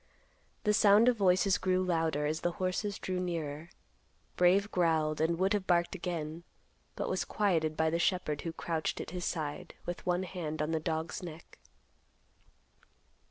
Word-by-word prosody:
The 210 Hz, -, +3 dB
sound 210 Hz, +2 st, +6 dB
of 250 Hz, -, +2 dB
voices 190 Hz, -1 st, +3 dB
grew 185 Hz, 0 st, +1 dB
louder 160 Hz, -4 st, 0 dB
as 155 Hz, +2 st, -1 dB
the 175 Hz, -, 0 dB
horses 190 Hz, +3 st, -2 dB
drew 185 Hz, -1 st, -3 dB
nearer. 165 Hz, -3 st, -4 dB, 0.7 s
Brave 190 Hz, +3 st, +4 dB
growled 160 Hz, -3 st, +1 dB
and 165 Hz, +1 st, +2 dB
would 190 Hz, +3 st, +2 dB
have 200 Hz, -2 st, -1 dB
barked 175 Hz, -1 st, +2 dB
again, 170 Hz, -3 st, -4 dB, 0.5 s
but -, -, -3 dB
was -, -, 0 dB
quieted 160 Hz, -7 st, 0 dB
by 160 Hz, 0 st, +2 dB
the 170 Hz, -, 0 dB
shepherd, 170 Hz, -6 st, 0 dB
who 165 Hz, -, -3 dB
crouched 165 Hz, -1 st, -2 dB
at -, -, -6 dB
his 180 Hz, -1 st, -4 dB
side, 150 Hz, -3 st, -4 dB
with 175 Hz, 0 st, -5 dB
one 180 Hz, +1 st, 0 dB
hand 165 Hz, -4 st, -5 dB
on 150 Hz, +1 st, -1 dB
the 160 Hz, -, +1 dB
dog's 160 Hz, +2 st, -3 dB
neck. 170 Hz, -2 st, -10 dB
175 Hz, 160 wpm, -31 LUFS, 160-185 Hz, 0.7 s, sound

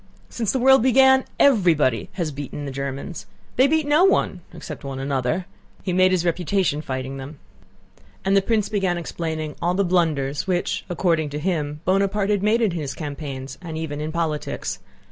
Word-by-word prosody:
Since 225 Hz, -4 st, -1 dB
the -, -, 0 dB
world 265 Hz, +1 st, +6 dB
began 265 Hz, +1 st, +5 dB
everybody 165 Hz, -, +3 dB
has 170 Hz, -5 st, -2 dB
beaten 145 Hz, +1 st, -6 dB
the 140 Hz, -, -4 dB
Germans. 140 Hz, +4 st, -5 dB, 0.3 s
They 260 Hz, +2 st, +5 dB
beat 315 Hz, +1 st, +1 dB
no 295 Hz, +4 st, +4 dB
one—except 385 Hz, -, -1 dB
one 135 Hz, -1 st, -5 dB
another. 135 Hz, +5 st, -1 dB, 0.4 s
He 185 Hz, -, -1 dB
made 185 Hz, +1 st, +4 dB
his 180 Hz, -2 st, +1 dB
reputation 175 Hz, -2 st, 0 dB
fighting 130 Hz, -1 st, -4 dB
them." 140 Hz, +3 st, -8 dB, 0.9 s
And 195 Hz, +1 st, +3 dB
the 195 Hz, -, +5 dB
prince 215 Hz, 0 st, +1 dB
began 190 Hz, -4 st, 0 dB
explaining 160 Hz, -3 st, -4 dB
all 175 Hz, +1 st, +1 dB
the 200 Hz, +1 st, +2 dB
blunders 155 Hz, -5 st, 0 dB
which, 180 Hz, -2 st, -1 dB
according 165 Hz, -3 st, +1 dB
to 145 Hz, -, -5 dB
him, 150 Hz, -3 st, -2 dB
Bonaparte 195 Hz, +2 st, +1 dB
had 205 Hz, -2 st, +1 dB
made 220 Hz, +3 st, +2 dB
in 210 Hz, -, +2 dB
his 155 Hz, -5 st, -4 dB
campaigns 140 Hz, -3 st, -6 dB
and 165 Hz, -3 st, -6 dB
even 150 Hz, -2 st, -4 dB
in 155 Hz, +1 st, -3 dB
politics. 160 Hz, -2 st, -3 dB
170 Hz, 170 wpm, -23 LUFS, 145-195 Hz, 0.9 s, world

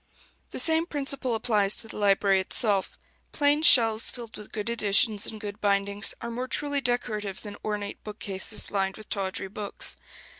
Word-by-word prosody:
The -, -, -7 dB
same 325 Hz, +1 st, +2 dB
principle 275 Hz, -5 st, 0 dB
applies 215 Hz, -3 st, +3 dB
to 225 Hz, -, -1 dB
the -, -, -9 dB
library 195 Hz, -1 st, +3 dB
itself: 195 Hz, +1 st, +1 dB, 0.4 s
plain 290 Hz, 0 st, +2 dB
shelves 230 Hz, -8 st, +6 dB
filled 235 Hz, -3 st, -6 dB
with 210 Hz, -, -11 dB
good 210 Hz, 0 st, -5 dB
editions 210 Hz, -2 st, +3 dB
in 220 Hz, -, -5 dB
good 205 Hz, -1 st, -8 dB
bindings 200 Hz, 0 st, 0 dB
are 235 Hz, -, -5 dB
more 250 Hz, +2 st, -4 dB
truly 285 Hz, +1 st, -2 dB
decorative 215 Hz, -6 st, -2 dB
than 205 Hz, -2 st, -8 dB
ornate 210 Hz, -1 st, -4 dB
bookcases 210 Hz, -1 st, -3 dB
lined 195 Hz, -1 st, -1 dB
with 215 Hz, -, -13 dB
tawdry 195 Hz, -1 st, -3 dB
books. 205 Hz, 0 st, -5 dB
215 Hz, 160 wpm, -26 LUFS, 200-245 Hz, 0.4 s, shelves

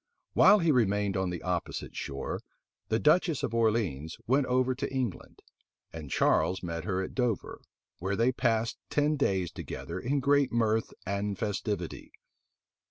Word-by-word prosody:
While 210 Hz, -, +7 dB
he 170 Hz, -5 st, +3 dB
remained 105 Hz, -5 st, +2 dB
on 95 Hz, -1 st, 0 dB
the 90 Hz, -1 st, -5 dB
opposite 90 Hz, -1 st, -3 dB
shore, 70 Hz, 0 st, -4 dB, 0.5 s
the 110 Hz, -, +1 dB
duchess 155 Hz, +3 st, +3 dB
of 115 Hz, -, -2 dB
Orleans 105 Hz, -10 st, 0 dB
went 135 Hz, +3 st, +2 dB
over 130 Hz, +1 st, +2 dB
to 135 Hz, +2 st, -4 dB
England; 130 Hz, -7 st, -4 dB, 0.5 s
and 80 Hz, -3 st, -7 dB
Charles 95 Hz, +7 st, +2 dB
met 85 Hz, -2 st, -4 dB
her 95 Hz, 0 st, -1 dB
at -, -, -6 dB
Dover, 125 Hz, -5 st, -1 dB, 0.4 s
where 95 Hz, +4 st, -1 dB
they 115 Hz, +5 st, +3 dB
passed 115 Hz, -2 st, 0 dB
ten 150 Hz, +1 st, +2 dB
days 95 Hz, -, 0 dB
together -, -, -6 dB
in 140 Hz, +4 st, 0 dB
great 140 Hz, 0 st, +3 dB
mirth 115 Hz, -1 st, +1 dB
and 100 Hz, 0 st, -2 dB
festivity. 105 Hz, -4 st, -3 dB
110 Hz, 150 wpm, -29 LUFS, 95-130 Hz, 0.5 s, While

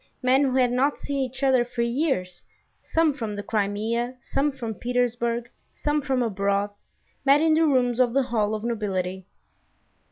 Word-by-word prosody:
Men 260 Hz, +2 st, +4 dB
who 260 Hz, -1 st, 0 dB
had 250 Hz, -2 st, +3 dB
not 270 Hz, +4 st, +1 dB
seen 280 Hz, -1 st, -3 dB
each 265 Hz, +1 st, -3 dB
other 260 Hz, -2 st, +4 dB
for 240 Hz, 0 st, -3 dB
years, 235 Hz, -, -1 dB, 0.4 s
some 325 Hz, -2 st, +1 dB
from 225 Hz, -6 st, -4 dB
the 205 Hz, -, -5 dB
Crimea, 220 Hz, +4 st, -1 dB
some 280 Hz, +4 st, -1 dB
from 240 Hz, -5 st, -5 dB
Petersburg, 235 Hz, 0 st, -1 dB, 0.3 s
some 295 Hz, 0 st, 0 dB
from 265 Hz, -3 st, 0 dB
abroad, 200 Hz, -1 st, 0 dB, 0.5 s
met 280 Hz, +1 st, +5 dB
in 320 Hz, 0 st, +3 dB
the 320 Hz, +1 st, +4 dB
rooms 250 Hz, -3 st, +2 dB
of 250 Hz, -2 st, +4 dB
the 275 Hz, 0 st, +3 dB
Hall 220 Hz, -4 st, 0 dB
of 215 Hz, -, -6 dB
Nobility. 190 Hz, -5 st, -2 dB
245 Hz, 165 wpm, -25 LUFS, 215-270 Hz, 0.5 s, met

